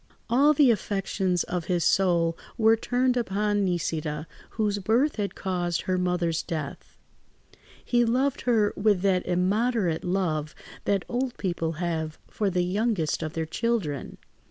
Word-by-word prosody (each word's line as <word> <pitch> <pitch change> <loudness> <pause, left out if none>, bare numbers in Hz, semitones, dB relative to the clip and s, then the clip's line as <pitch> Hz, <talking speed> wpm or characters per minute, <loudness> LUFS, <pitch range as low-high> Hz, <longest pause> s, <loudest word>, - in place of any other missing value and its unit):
All 280 +5 +5
the 275 -4 +6
affections 195 -4 -1
of 175 -2 -3
his 175 -2 0
soul 170 -4 +3 0.2
were 225 0 +5
turned 250 +2 +1
upon 205 -3 0
Nisida, 155 -4 -2 0.3
whose 205 -2 +1
birth 235 +10 +1
had 205 -2 -2
caused 175 -3 -1
her 185 - -1
mother's 180 -2 0
death; 155 -4 -6 0.9
he 240 -1 +3
loved 255 +4 +1
her 220 -4 +2
with 205 -3 +2
that 190 -2 +2
immoderate 185 0 +1
love 165 -5 -1 0.3
that 200 -2 +1
old 250 +1 -2
people 170 -4 -2
have 160 -2 -3
for 205 -2 -1
the 180 -1 +1
youngest 195 -3 0
of 155 -1 -4
their 160 -1 -2
children. 165 - -2
190 Hz, 140 wpm, -26 LUFS, 170-225 Hz, 0.9 s, the